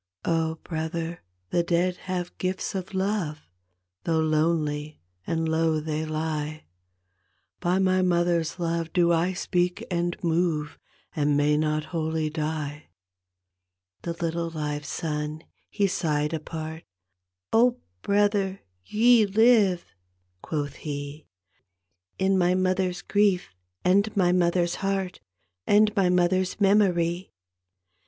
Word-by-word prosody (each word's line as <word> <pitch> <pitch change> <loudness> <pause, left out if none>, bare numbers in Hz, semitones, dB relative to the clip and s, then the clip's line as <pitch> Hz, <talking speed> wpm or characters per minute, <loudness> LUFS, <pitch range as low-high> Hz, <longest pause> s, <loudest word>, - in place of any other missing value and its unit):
Oh, 160 -1 +1
brother, 165 +1 -4 0.3
the 175 - +3
dead 175 +1 +1
have 180 -1 -4
gifts 185 0 -2
of 190 0 -5
love, 190 -6 -2 0.6
Though 165 -1 +1
lonely 155 -1 0 0.3
and 165 0 0
low 160 0 +2
they 155 0 -3
lie, 155 -1 -3 0.9
By 175 +2 +1
my 185 -1 +3
mother's 175 -2 +1
love 165 -1 -2
do 170 -1 +4
I 170 +3 +1
speak 180 -1 -1
and 175 0 -1
move 165 -3 0 0.4
And 145 -2 +2
may 145 +1 +3
not 155 0 0
wholly 160 -1 -1
die." 155 -1 -4 1.1
The 170 -1 -4
litde 170 0 -3
live 150 -1 -3
son 150 +1 -3 0.3
he 205 - +1
sighed 150 -5 0
apart, 160 0 -5 0.4
" 90 0 -27
Oh, 245 +2 +4 0.2
brother, 200 -1 +1 0.2
ye 225 - +4
live," 205 -4 +4 0.6
quoth 145 -3 -3
he, 145 0 -6 0.4
" 90 0 -56 0.3
In 190 0 +2
my 180 0 +3
mother's 185 -1 0
grief 200 - +1 0.3
and 200 +3 +3
my 180 -2 +4
mother's 175 -1 +2
heart 195 -2 -1 0.5
And 210 +1 +4
my 190 -3 +3
mother's 180 +2 +1
memory. 185 -3 +2
170 Hz, 120 wpm, -26 LUFS, 155-185 Hz, 1.1 s, do